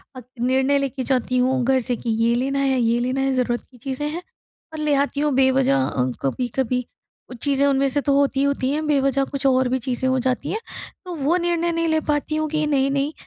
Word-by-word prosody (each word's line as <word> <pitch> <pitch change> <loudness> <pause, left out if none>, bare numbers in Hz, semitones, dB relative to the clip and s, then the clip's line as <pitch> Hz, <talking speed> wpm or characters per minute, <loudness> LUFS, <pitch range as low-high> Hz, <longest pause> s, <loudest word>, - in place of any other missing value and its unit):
और 255 - -9 0.2
निर्णय 265 +3 +2
लेके 270 -1 -3
जाती 255 -1 0
हूँ 255 0 +2
घर 265 0 +3
से 245 +1 -1
कि 235 - -5
ये 235 - +3
लेना 270 +3 -1
है, 270 -2 +1
ये 235 0 +2
लेना 255 +2 -1
है 270 0 +1
ज़रूरत 245 -2 0
की 250 - -17
चीज़ें 270 +4 -4
हैं, 330 +4 -5 0.5
और 310 - -6
ले 300 -1 +1
आती 280 +1 0
हूँ 295 -1 +1
बेवजह 265 - +3
अ, 130 -2 -1 0.2
कभी-कभी 250 - -1 0.5
कुछ 250 - -10
चीज़ें 280 -1 +2
उनमें 275 0 +2
से 285 +2 0
तो 280 0 +1
होती 275 -1 +1
ही 275 - +3
होती 280 -2 0
हैं 305 +2 -1
बेवजह 275 -2 +2
कुछ 275 0 -5
और 260 -1 +3
भी 260 - +1
चीज़ें 255 +1 -2
हो 260 - +2
जाती 255 +2 -1
हैं, 435 - -2 0.5
तो 360 - -6
वो 310 +4 +1
निर्णय 345 -1 0
नहीं 330 0 0
ले 315 0 +2
पाती 295 +1 0
हूँ 310 0 -1
कि 305 0 0
नहीं-नहीं 275 +1 +1
270 Hz, 230 wpm, -22 LUFS, 255-285 Hz, 0.5 s, घर